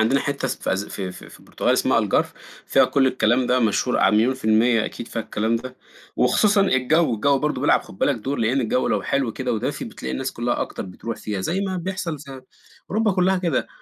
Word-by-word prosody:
عندنا 125 +6 +3
حتّة 140 -1 -2
اس - - -2
في - - -2
أس 95 +2 -1
في 95 -2 -5
في - - -13
البرتغال - - -1
اسمها - - +2
Algarve - - +1 0.4
فيها - - +4
كل 135 -1 +2
الكلام 125 -1 +2
ده 125 - +2
مشهور 115 +2 +1
ع - - +4
مليون 115 +5 +3
في 130 - -13
المِيّة 110 +1 +3
أكيد 120 - -6
فيها 115 - -3
الكلام 110 +2 -1
ده 130 +2 -8 0.4
وخصوصًا 200 - +3
الجَو، 155 -4 +2
الجَو 140 +6 +2
برضه 150 +2 -1
بيلعب - - +3
خُد 95 - -14
بالك 145 - +2
دور، 135 +4 -4
لإن 115 +4 +1
الجَو 125 +1 0
لو - - 0
حلو 135 -5 -1
كده 125 0 -3
ودافي، 110 - -2
بتلاقي 65 - -6
الناس 65 - -3
كُلّها - - -2
أكتر - - -4
بتروح 110 +5 -6
فيها، 105 -3 -4
زي 175 - -1
ما 190 -2 -2
بيحصل 180 -3 -4
ز 145 - -12 0.7
أوروبا 215 +1 +1
كُلّها 190 +1 +2
كده. 170 -7 0
130 Hz, 215 wpm, -22 LUFS, 110-150 Hz, 0.7 s, فيها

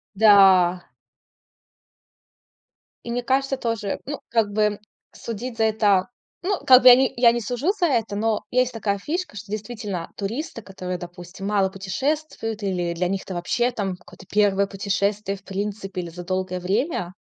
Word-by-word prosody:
Да. 190 -4 +6 2.2
И 235 - -5
мне 245 - -1
кажется 270 +2 +1
тоже 230 -5 -3
ну, 290 - -5
как 225 -3 +2
бы 210 0 +1 0.3
судить 230 +2 -6
за 225 - +3
это. 205 -4 +2 0.3
Ну, 385 +1 0
как 255 -1 +8
бы 255 - +9
я 245 - +10
не 265 0 +2
я 235 -1 +6
не 240 - -2
сужу 245 - -1
за 350 - +3
это, 230 -8 0
но 220 +1 0
есть 255 0 +2
такая 205 -3 -1
фишка, 340 - -4
что, 205 0 -9
действительно, 210 -4 -5
туристы, 230 +6 -4
которые, 185 -2 -6
допустим, 175 +2 -9
мало 200 -2 +2
путешествуют, 225 +3 -3
или 180 -3 -1
для 175 +1 -1
них 195 +1 -2
это 190 - -8
вообще 240 +8 0
там 195 -6 -3
какое-то 180 +1 -16
1 200 -1 +3
путешествие 200 0 -1
в 195 - -24
принципе 195 -1 -4
или 170 - -7
за 175 +1 -9
долгое 185 0 -2
время. 190 - -1
205 Hz, 165 wpm, -23 LUFS, 190-240 Hz, 2.2 s, я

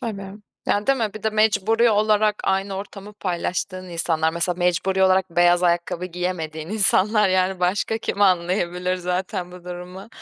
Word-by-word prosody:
Tabii. 200 -6 -5 0.4
Yani, 205 +1 0
değil 275 0 +3
mi? 220 -3 -2
Bir 215 - -8
de 220 - +1
mecburi 220 +2 +3
olarak 215 0 +3
aynı 195 +1 0
ortamı 200 +1 -8
paylaştığın 185 -1 -3
insanlar, 165 -2 0
mesela, 170 +1 -1
mecburi 185 +2 +1
olarak 190 -1 +3
beyaz 175 +1 +3
ayakkabı 175 0 0
giyemediğin 170 -3 -4
insanlar. 210 0 +3
Yani, 185 0 +1
başka 200 +5 0
kim 205 - -4
anlayabilir 180 -1 +1
zaten 180 0 -3
bu 180 -1 -12
durumu? 180 +3 -8
185 Hz, 155 wpm, -22 LUFS, 180-205 Hz, 0.4 s, değil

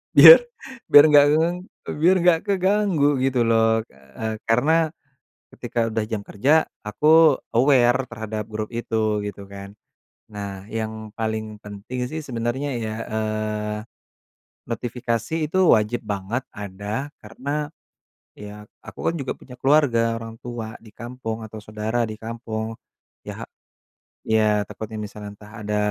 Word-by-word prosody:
biar - - +12 0.5
biar 145 - +9
nggak 145 -1 +8
gagang 165 +3 +1 0.4
biar 175 +4 +5
nggak 175 -2 +5
keganggu 195 -5 +2
gitu 130 -2 +2
loh. 115 -1 +3
Eee, 70 +12 -7
karena 155 +8 +3 0.6
ketika - - -5
udah 110 0 -1
jam 110 -1 -4
kerja 105 +7 -1 0.3
aku 150 +7 +4 0.2
aware 130 -1 +4
terhadap 110 -3 -5
grup 110 0 -5
itu 110 -3 -1
gitu 100 -1 -8
kan. 100 0 -9 0.5
Nah, 100 -2 -7
yang 110 -1 -5
paling 110 -1 -3
penting 105 +5 -6
sih 160 - -3
sebenarnya 130 0 -3
ya, 110 -1 -3
eee, 110 -1 -2 1.0
notifikasi 115 +3 -3 0.2
itu 185 - 0
wajib 110 -2 +2
banget 105 +5 -3
ada 105 +7 -5
karena 140 +7 -4 0.7
ya 105 0 -9 0.2
aku - - -10
kan - - -5
juga 130 - -2
punya 125 - -13
keluarga, 125 -6 +3
orang 115 0 -7
tua 120 -2 -6
di 115 - -16
kampung, 115 -1 -6
atau 110 0 -9
saudara 110 +3 -2
di 110 - -5
kampung, 110 0 -5 0.5
ya - - -7
ha - - -3 0.8
iya, 110 -1 +3
takutnya 110 0 -7
misalnya 105 0 -7
entah 105 +1 -15
ada 105 0 -1
110 Hz, 130 wpm, -23 LUFS, 105-130 Hz, 1.0 s, biar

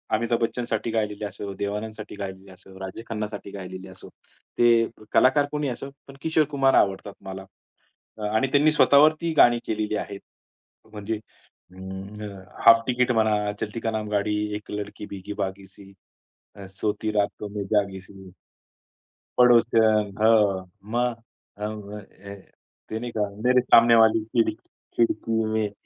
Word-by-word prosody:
अमिताभ 115 +1 0
बच्चनसाठी 115 -1 -2
गायलेली 105 -2 -2
असो, 100 0 -6
देवानंदसाठी 105 +2 -5
गायलेली 95 -1 -7
असो, 95 +1 -15
राजेश 95 +4 -7
खन्नासाठी 105 -2 -5
गायलेली 95 -1 -8
असो, 95 0 -13 0.5
ते 115 -1 +5 0.3
कलाकार 140 +3 +4
कोणीही 150 -3 -1
असो 135 - -8 0.2
पण 135 - -12
किशोर 160 0 +2
कुमार 135 -1 +3
आवडतात 100 0 +1
मला. 95 0 -7 0.9
आणि 130 +5 +2
त्यांनी 150 +2 +4
स्वतःवरती 155 +3 +4
गाणी 120 -3 +6
केलेली 110 -1 -1
आहेत. 100 -1 -6 0.7
म्हणजे 105 +1 -4 0.6
अं, 95 +1 -8 0.2
हाल्फ 115 0 +8
तिकिट 125 0 +2
म्हणा, 105 -3 +1
चलती 110 +1 -4
का 115 - -2
नाम 110 -1 -3
गाडी, 105 0 0 0.2
एक 105 - -8
लडकी 105 0 -6
भिगी 100 +1 -7
भागीसी 95 0 -6
सी, 95 - -16 0.6
अ, 100 - -10
सोती 110 +1 -1
रातो 105 0 -1
मे 100 - -2
जागीसी. 95 -1 -3 1.1
पडोसन. 115 -4 +4
हो, 105 -4 +4 0.3
मग 120 -1 -1 0.4
अं, 105 0 -6 0.9
ते 110 - -3
नाही 120 +1 -5
का 105 -2 -1 0.2
मेरे 125 0 +4
सामने 115 -1 +6
वाली 110 -1 +5
खिडक 115 0 0 0.4
खिडकी 115 -1 +1
में 110 -2 0
105 Hz, 135 wpm, -25 LUFS, 100-115 Hz, 1.1 s, हाल्फ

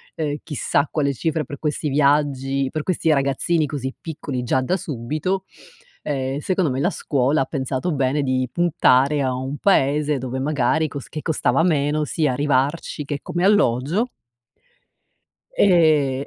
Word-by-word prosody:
ehm, 150 -2 -2
chissà 150 -1 0
quale 140 -3 0
cifre 160 +3 -1
per 140 +1 -9
questi 150 -1 -2
viaggi 140 -1 +1
per 155 -1 -3
questi 165 -2 +1
ragazzini 150 +3 +1
così 135 -2 -4
piccoli 145 -5 -5
già 130 +2 +1
da 180 +9 0
subito, 155 +7 -3 0.6
ehm, 135 -2 -2
secondo 180 -2 0
me 130 - -2
la 175 - +2
scuola 140 -5 0
ha 135 - +1
pensato 135 +3 -2
bene 140 0 0
di 130 -1 0
puntare 150 -4 +3
a 130 -1 0
un 130 +3 -4
paese 150 -5 +2
dove 130 +1 -4
magari 145 +2 +1
cos 140 -1 -8
che 155 - -6
costava 150 -2 +1
meno 150 -2 +1
sia 150 -1 0
arrivarci 145 +3 0
che 145 0 -4
come 175 +1 -3
alloggio 190 - +2 1.5
e 155 -7 +3
145 Hz, 150 wpm, -21 LUFS, 135-155 Hz, 1.5 s, puntare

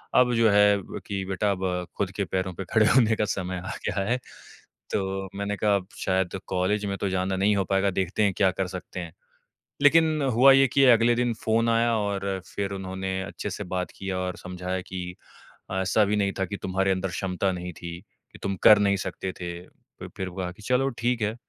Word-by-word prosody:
अब 125 -1 +5
जो 115 -1 +4
है 105 0 +5
ब - - -8
कि 100 -1 -3
बेटा, 95 +2 0
अब 90 -2 -2
खुद 95 -2 -1
के 100 - +1
पैरों 95 0 -2
पे 95 +3 -6
खड़े 110 -1 +5
होने 115 -4 +5
का 105 - 0
समय 95 -1 -3
आ - - -4
गया 95 - 0
है।" 125 - +2 0.8
तो 95 0 -2
मैंने 100 +1 -2
कहा, 105 0 +2
"अब 95 -2 -2
शायद 95 0 0
कॉलेज 95 +3 0
में 100 -1 -2
तो 100 - -1
जाना 95 0 -1
नहीं 100 +2 +2
हो 95 - +1
पाएगा। 95 +1 +3
देखते 95 +3 -1
हैं, 100 - +2
क्या 95 -2 +4
कर 95 - 0
सकते 90 +1 -8
हैं।" 85 -2 -7 0.7
लेकिन 155 +1 +5
हुआ 135 +3 +8
ये 135 0 +6
कि 135 +2 +3
अगले 115 +1 +5
दिन 120 0 +1
फ़ोन 115 +1 +2
आया 115 0 +3
और 100 -2 -2 0.2
फिर 100 -1 -2
उन्होंने 95 0 -4
अच्छे 105 - -5
से 100 - -5
बात 90 0 -2
किया 95 -1 -3
और 90 0 -3
समझाया 90 0 -4
कि, 90 -1 -6 0.6
"ऐसा 95 +3 +2
भी 105 - 0
नहीं 100 -1 +1
था 95 - +1
कि 100 +1 -5
तुम्हारे 95 +1 +1
अंदर 95 0 -1
क्षमता 95 +1 -1
नहीं 90 -1 -5
थी, 85 +1 -7 0.3
कि - - -13
तुम 95 0 -1
कर 105 - +9
नहीं 100 -1 +3
सकते 95 0 -4
थे।" 85 0 -4
फ - - -14
फिर 95 - -3
हुआ 90 0 -4
कि 95 - -16
चलो, 125 +4 +2
ठीक 120 -1 -1
है। 105 +1 0
95 Hz, 215 wpm, -26 LUFS, 95-105 Hz, 0.8 s, कर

